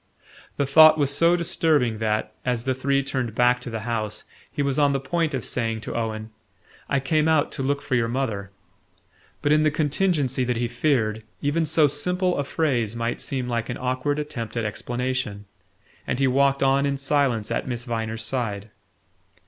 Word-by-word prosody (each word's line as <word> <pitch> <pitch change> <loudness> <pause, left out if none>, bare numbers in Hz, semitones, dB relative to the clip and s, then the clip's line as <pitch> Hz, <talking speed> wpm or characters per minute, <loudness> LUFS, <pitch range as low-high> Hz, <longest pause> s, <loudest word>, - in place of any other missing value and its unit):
The 140 - +1
thought 155 +3 +7
was 140 -1 +1
so 170 +3 +4
disturbing 150 -9 +1
that, 110 -1 -1
as 125 -2 -1
the 130 +1 0
three 140 +2 0
turned 130 -5 -3
back 125 +1 +3
to 125 - -6
the 115 -1 -4
house, 110 -2 -3 0.3
he 145 - -1
was 140 0 0
on 145 -1 +4
the 135 - 0
point 155 +2 -1
of 125 - -3
saying 115 -2 -2
to - - -6
Owen: 110 -1 -3 0.6
"I 140 - +2
came 155 +3 +1
out 160 -2 +2
to - - -4
look 140 +1 -1
for - - -4
your 120 -2 +2
mother." 115 -6 -2 0.9
But, 145 - +2
in 155 0 +5
the 155 - +4
contingency 150 -3 0
he 120 0 0
feared, 115 -5 0 0.2
even 155 +3 +1
so 155 0 +4
simple 180 +6 +1
a 145 - 0
phrase 125 -8 -1
might 115 0 -2
seem 130 -2 -3
like 115 -1 -2
an 120 - -3
awkward 130 +3 -1
attempt 125 -7 -5
at 115 - -1
explanation; 120 -1 -3 0.6
and - - -1
he 135 - +2
walked 140 +1 +2
on 135 +1 +3
in 140 0 -1
silence 135 -6 0
at - - -2
Miss 120 -1 -3
Viner's 115 -2 -3
side. 110 -5 -3
130 Hz, 185 wpm, -24 LUFS, 115-145 Hz, 0.9 s, thought